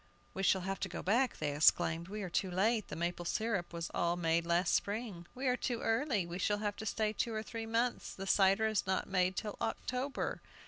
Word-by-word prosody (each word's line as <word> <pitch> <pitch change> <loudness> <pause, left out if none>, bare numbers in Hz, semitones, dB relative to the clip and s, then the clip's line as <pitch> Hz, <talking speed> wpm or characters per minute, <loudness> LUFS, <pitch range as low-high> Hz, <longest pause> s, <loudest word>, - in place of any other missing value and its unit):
"We 190 - -3
shall 190 -1 +3
have 195 +2 -3
to 190 - -2
go - - -5
back," 240 +7 +2
they 145 -2 -2
exclaimed. 165 +2 +3
"We 210 +1 -5
are 185 - -4
too 190 - 0
late! 210 +4 +1
The - - -6
maple 175 +1 -2
syrup 200 0 -1
was 170 0 -4
all 170 0 +1
made 170 0 +1
last 170 +1 +2
spring." 205 -5 -2
"We 260 +2 -4
are 250 -1 +3
too 245 -2 -2
early; 225 - +1
we 170 +1 -6
shall 205 +2 +1
have 205 -1 -2
to 220 - -5
stay 215 0 0
two 225 +1 -1
or 215 - -2
three 225 0 -6
months, 235 +2 -1
the 195 - -6
cider 195 +2 +4
is 215 -3 0
not 190 - 0
made 185 -1 +1
till 210 -2 -4
October." 255 +4 -2
195 Hz, 225 wpm, -34 LUFS, 175-225 Hz, -, cider